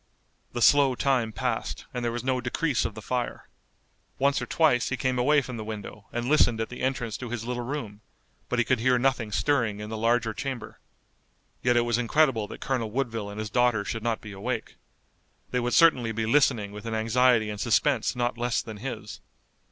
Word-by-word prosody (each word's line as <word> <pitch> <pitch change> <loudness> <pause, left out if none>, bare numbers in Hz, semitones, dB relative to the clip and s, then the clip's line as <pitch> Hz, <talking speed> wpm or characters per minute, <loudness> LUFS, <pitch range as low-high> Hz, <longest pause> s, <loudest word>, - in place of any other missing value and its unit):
The 120 - 0
slow 140 -3 +5
time 125 -4 +1
passed, 100 - -3
and 125 - -3
there 120 - 0
was 120 0 -4
no 130 -1 0
decrease 125 0 0
of 105 - -4
the 110 - -9
fire. 125 +1 -3 0.7
Once 140 +1 +2
or - - -4
twice 150 -7 +2
he 130 - -2
came 130 -1 0
away 145 +3 +4
from 125 -2 -6
the 110 - -5
window 105 -1 -8
and 120 0 -3
listened 125 -6 +4
at 115 - -2
the 125 - -8
entrance 125 -4 -1
to 125 - -7
his 115 -1 -4
little 125 0 -3
room, 120 -5 -5 0.5
but 125 - 0
he 120 - +2
could 130 -3 +1
hear 125 +2 +3
nothing 120 -4 0
stirring 115 -3 +1
in 105 +1 -7
the 110 - -3
larger 115 0 +1
chamber. 130 -1 -5 0.8
Yet 120 -1 +3
it 120 - +3
was 120 0 +1
incredible 125 -3 +2
that - - -10
Colonel 125 -5 -1
Woodville 115 -3 -2
and 100 +1 -7
his 110 -1 -4
daughter 120 -4 +2
should 115 +2 -3
not 115 0 -1
be 110 - -9
awake. 110 +4 -4 0.8
They 125 - +1
would 120 0 0
certainly 130 -9 +5
be 110 0 -2
listening 115 -5 +2
with 105 +2 -8
an 115 - -2
anxiety 115 0 +3
and 105 0 -6
suspense 120 +2 +2
not 120 -1 -1
less 120 -1 0
than 110 -2 -8
his. 110 -2 -7
120 Hz, 205 wpm, -27 LUFS, 110-130 Hz, 0.8 s, slow